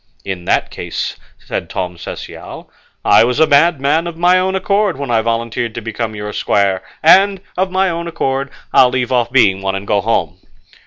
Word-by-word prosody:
"In 95 -3 -5
that - - 0
case," - - -4 0.2
said - - -5
Tom 90 -1 -4
Cecial, 85 - -9 0.3
"I - - +6
was 125 +1 0
a 160 - +6
madman 155 +1 +2
of 170 -1 -7
my 180 +2 +4
own 190 +1 0
accord 200 -3 0
when 140 -3 -4
I 115 -1 +3
volunteered 115 0 -2
to 115 - -4
become 110 0 -4
your 105 0 -6
squire, 100 -2 +1 0.2
and, 195 +4 +5 0.2
of 190 +1 0
my 190 +1 +1
own 170 0 -4
accord, 135 -4 -2 0.2
I'll 125 - +6
leave 125 0 -2
off 120 -2 +1
being 100 -7 +3
one 95 0 -2
and 95 +1 -5
go 105 -1 +1
home." 90 -5 -1
125 Hz, 190 wpm, -16 LUFS, 105-170 Hz, 0.3 s, I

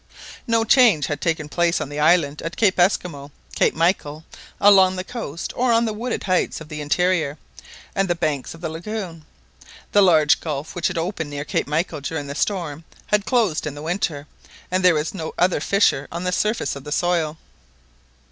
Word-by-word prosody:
No 230 -1 +2
change 225 - +5
had 145 -1 -4
taken 160 -3 -1
place 170 +2 +1
on - - -4
the 145 +1 -5
island 150 -2 +3
at 165 +1 -6
Cape 195 -4 +2
Esquimaux, 175 -6 +1 0.2
Cape - - +2
Michael, 160 -2 0 0.3
along 190 -2 +6
the 185 - -3
coast, 185 - -6
or 250 0 +1
on 230 0 +3
the 220 - -2
wooded 235 +3 -3
heights 185 -1 0
of 160 -1 -11
the 150 -1 -6
interior, 160 -1 0 0.6
and 195 0 +1
the 175 - 0
banks 155 -4 -2
of 165 - -15
the 165 - -3
lagoon. 170 -1 -6 0.7
The 205 - +5
large 160 -6 +5
gulf 150 -2 -5
which 175 - 0
had 185 - -4
opened 165 -2 -3
near 145 0 -5
Cape - - -1
Michael 150 0 -2
during 145 +1 -4
the 140 - -6
storm 165 -3 -2 0.2
had 210 0 0
closed 215 - +1
in 145 - -5
the 145 - -8
winter, 160 -4 -2 0.5
and 185 0 0
there 180 -2 +6
was 150 +1 -2
no 160 -5 -6
other 180 -1 +2
fissure 160 -5 +2
on 170 +2 -4
the 180 - -1
surface 210 +1 0
of 140 - -9
the 150 - -8
soil. 165 -2 0
170 Hz, 195 wpm, -22 LUFS, 150-190 Hz, 0.7 s, along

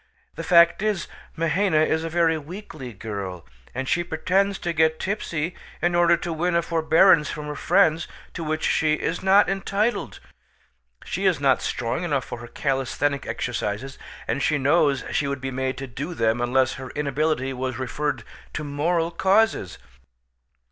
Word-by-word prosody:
The - - -6
fact 170 0 +5
is, 210 -4 -1 0.3
Mahaina 165 0 +2
is 160 +1 0
a 165 - -3
very 165 -1 +2
weakly 155 -4 -8
girl, 100 -5 -6 0.3
and 130 +1 -3
she 175 - +1
pretends 190 +4 0
to 170 - -3
get 160 0 +2
tipsy 175 -5 -2 0.3
in 175 0 +1
order 175 0 +4
to 170 - -4
win 170 +2 0
a 170 - +2
forbearance 165 -1 +4
from 150 -2 -5
her 150 0 -5
friends 160 +3 +2 0.3
to 170 - -5
which 155 0 -1
she 155 -1 +2
is 165 +2 -3
not 195 +2 +5
entitled. 200 +4 -1 0.9
She - - -1
is - - +2
not - - +3
strong 120 +6 -2
enough 140 -7 -1
for - - -7
her 120 - -9
calisthenic 135 +2 -1
exercises, 120 +2 -3 0.3
and 140 - -1
she 150 +2 +2
knows 145 0 +2
she 145 - 0
would 140 -1 -3
be 135 +1 -4
made 130 0 -2
to 135 - -5
do 140 +7 -6
them 115 -1 +1
unless 130 +2 +2
her 130 - -7
inability 145 -1 -1
was 130 -1 -3
referred 145 +3 -2 0.3
to 155 - -3
moral 165 +4 0
causes." 190 - +2
155 Hz, 165 wpm, -24 LUFS, 130-170 Hz, 0.9 s, fact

